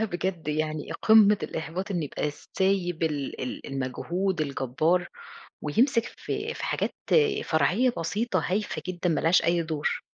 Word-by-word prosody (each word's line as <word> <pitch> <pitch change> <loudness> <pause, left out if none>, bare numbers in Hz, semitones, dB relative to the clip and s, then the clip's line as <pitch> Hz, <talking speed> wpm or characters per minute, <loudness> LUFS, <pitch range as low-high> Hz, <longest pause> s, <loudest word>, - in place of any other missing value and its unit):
لأ، - - +2
بجد 175 -4 -3
يعني 155 0 -2
قمّة 210 -2 +6
الإحباط 170 +5 -4
إن 175 -4 0
يبقى 150 +1 -2
سايب 180 0 -1
ال 150 -4 -2
ال 125 - -5
المجهود 165 +8 -2
الجبار، 155 +5 0 0.5
ويمسك 230 - +2
في - - -3
في - - -5
حاجات - - -1 0.5
فرعية 180 - +2
بسيطة 185 +1 -1
هايفة 205 +2 -1
جدًا، 175 -1 -1
ما 155 - +1
لهاش 165 +2 +4
أي 170 0 +2
دور. 155 -2 -2
170 Hz, 140 wpm, -27 LUFS, 155-195 Hz, 0.5 s, قمّة